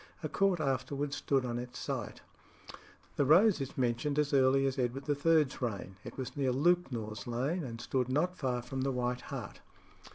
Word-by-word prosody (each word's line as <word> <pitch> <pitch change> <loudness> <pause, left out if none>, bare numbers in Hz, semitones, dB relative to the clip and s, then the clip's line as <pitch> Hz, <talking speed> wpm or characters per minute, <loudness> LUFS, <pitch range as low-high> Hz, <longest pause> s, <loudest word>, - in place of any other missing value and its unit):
A - - -2
court 195 -3 +2
afterwards 140 0 -1
stood 135 -2 +1
on 120 -1 -2
its 125 0 -7
site. - - -4 1.0
The - - +4
Rose 180 +5 +5
is 135 - -5
mentioned 130 +4 0
as 150 -1 +1
early 135 0 +4
as 135 0 -1
Edward 130 +2 -2
III.'s 150 -1 +2
reign. 100 -5 -3
It - - -9
was 130 -2 -5
near 135 -3 +1
Lewknor's 125 -9 0
Lane, 135 +9 -1
and 115 -4 -6
stood 125 +1 -1
not 170 +7 +1
far 125 -7 -2
from 130 +2 -4
the 135 +1 0
White 125 -1 -1
Hart. - - -7
135 Hz, 175 wpm, -32 LUFS, 125-145 Hz, 1.0 s, Rose